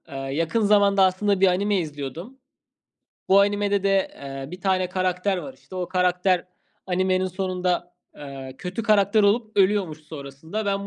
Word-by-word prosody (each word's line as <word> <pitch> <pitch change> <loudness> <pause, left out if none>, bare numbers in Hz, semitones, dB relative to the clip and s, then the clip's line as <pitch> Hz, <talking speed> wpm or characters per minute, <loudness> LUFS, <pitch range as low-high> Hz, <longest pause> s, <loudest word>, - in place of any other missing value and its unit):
Aaa, 135 0 -6
yakın 165 +10 0
zamanda 200 -2 +4
aslında 190 +1 +2
bir 195 - +6
anime 200 +3 +1
izliyordum. 160 - -6 0.9
Bu 195 +1 +6
animede 205 0 +1
de, 195 -1 +2
eee, 135 0 -8
bir 180 +1 -9
tane 185 -1 +1
karakter 185 +1 0
var 265 +8 -7
işte. - - -16
O 180 -1 -3
karakter 180 0 +1 0.4
animenin 185 0 +1
sonunda, 180 -1 -2 0.2
ııı, 135 -2 -9
kötü 185 +8 -5
karakter 210 0 +3
olup 215 +2 +1
ölüyormuş 195 -5 +2
sonrasında. 155 +7 -7
Ben 200 0 -1
185 Hz, 150 wpm, -24 LUFS, 170-200 Hz, 0.9 s, bir